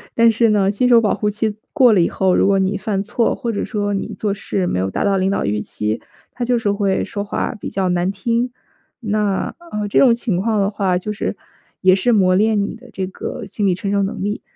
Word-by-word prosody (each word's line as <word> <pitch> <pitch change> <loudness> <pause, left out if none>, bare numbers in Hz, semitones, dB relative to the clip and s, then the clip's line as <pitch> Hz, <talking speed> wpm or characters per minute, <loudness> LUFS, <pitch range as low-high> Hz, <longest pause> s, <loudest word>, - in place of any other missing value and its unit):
但 230 0 +5
是 225 0 +2
呢， 200 -2 +3
新 245 +5 +1
手 235 -2 +6
保 210 - +2
护 210 0 -1
期 215 +1 -1 0.2
过 260 -6 +6
了 205 - +4
以 170 - +4
后， 190 -1 +1
如 - - +3
果 195 0 +3
你 190 +1 0
犯 195 0 -2
错， 225 +2 0
或 235 -4 -3
者 205 - -2
说 205 -2 -2
你 195 - -3
做 205 -2 -1
事 195 -2 -2
没 90 - -1
有 95 +1 -1
达 - - -2
到 200 -1 +2
领 190 0 +1
导 200 - 0
预 105 +1 -1
期， 105 +1 -3 0.3
他 245 - -4
就 245 0 +2
是 215 -3 0
会 200 -2 0
说 205 - -4
话 - - -2
比 - - -5
较 190 -1 -1
难 180 +1 +1
听， 230 +5 -1 0.5
那， 210 -3 -1 0.2
呃， 210 0 -2
这 - - +3
种 245 -4 +6
情 230 -6 -2
况 215 +1 +1
的 195 - +1
话 195 -3 0
就 200 +4 -4
是 210 - -3 0.5
也 185 0 +6
是 200 +6 +2
磨 185 -4 +4
练 215 +1 +3
你 200 - -3
的 245 +2 -14
这 190 - -2
个 190 - -6
心 205 -2 -2
理 180 - +2
承 195 +2 -3
受 200 0 +2
能 195 0 -3
力， 205 +1 -2
205 Hz, 270 characters per minute, -19 LUFS, 190-220 Hz, 0.5 s, 手